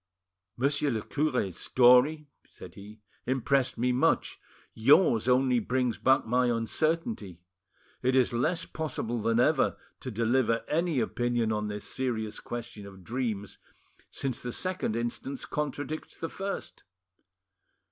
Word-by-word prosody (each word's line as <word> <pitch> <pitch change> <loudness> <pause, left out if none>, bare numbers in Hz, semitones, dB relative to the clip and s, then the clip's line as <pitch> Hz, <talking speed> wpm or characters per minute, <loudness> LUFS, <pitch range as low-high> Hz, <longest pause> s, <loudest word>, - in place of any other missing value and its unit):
"Monsieur 145 +3 +1
le 110 -5 -2
cure's 125 - -1
story," 130 +5 +4 0.2
said - - -12
he, 105 +2 -12 0.3
"impressed 130 0 +1
me 125 +2 +1
much; 125 +1 +1 0.3
yours 120 - +4
only 125 -1 +3
brings 125 +1 -1
back 130 +1 +3
my 125 +2 +2
uncertainty. 120 - -1 0.6
It 130 +1 +2
is 130 -2 +3
less 155 +9 0
possible 120 -7 -3
than 115 +2 +1
ever 145 +3 +3 0.2
to 130 - -6
deliver 115 +1 +1
any 165 -2 +1
opinion 120 -2 0
on 105 -1 -1
this 105 0 -5
serious 110 -5 -3
question 115 -4 -7
of 95 -2 -13
dreams, 110 -3 -4 0.5
since 135 -3 -4
the 120 - -4
second 185 -11 -2
instance 120 +3 -3
contradicts 150 +1 -4
the 165 - -4
first." 195 +1 -6
125 Hz, 125 wpm, -29 LUFS, 115-140 Hz, 0.6 s, story